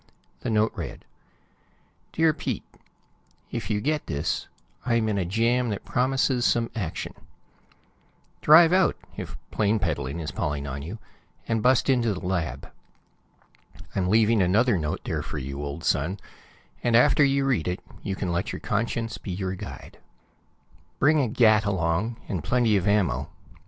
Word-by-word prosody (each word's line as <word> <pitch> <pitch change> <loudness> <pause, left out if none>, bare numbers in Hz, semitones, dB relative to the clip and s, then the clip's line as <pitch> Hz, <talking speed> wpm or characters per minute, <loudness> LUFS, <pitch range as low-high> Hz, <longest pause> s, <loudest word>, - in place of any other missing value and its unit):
The - - -4
note 110 0 +2
read: - - -7 1.1
Dear 160 -1 +3
Pete: 135 -7 -4 0.9
If 115 -2 -4
you 105 -2 +1
get 150 +6 -1
this, 75 +5 -2 0.4
I'm 115 -2 +1
in 105 -2 0
a 90 - 0
jam 115 +6 +1
that 100 - -4
promises 130 0 +1
some 115 -1 +2
action. 95 -8 -4 1.3
Drive 165 +3 +7
out, 190 0 +4 0.2
if - - -7
plane 105 +1 +2
peddling 75 -6 -2
is 75 -4 -4
palling 75 0 -2
on 70 0 -5
you, 85 +10 -6 0.5
and 115 -1 0
bust 125 +2 +3
into 120 -6 +2
the 95 - -7
lab. 90 -4 -3 1.2
I'm 90 -2 0
leaving 110 0 +4
another 105 +6 +3
note 75 -4 -2
there - - -2
for - - -6
you, 70 +1 -5
old 70 +3 -5
son, 90 +8 0 0.6
and 120 - +2
after 145 +5 +5
you 140 0 +2
read 125 - +1
it 90 +1 -2 0.2
you 95 - -3
can 95 -2 -3
let 85 +2 -1
your - - -5
conscience 115 +2 -2
be - - -8
your 95 0 -2
guide. 95 - -9 1.0
Bring 155 +2 +4
a 135 - +2
gat 110 -1 +4
along, 95 +3 0
and 90 -6 -3
plenty 120 -4 +2
of 95 -1 +1
ammo. 100 -3 +1
105 Hz, 155 wpm, -26 LUFS, 90-120 Hz, 1.3 s, Drive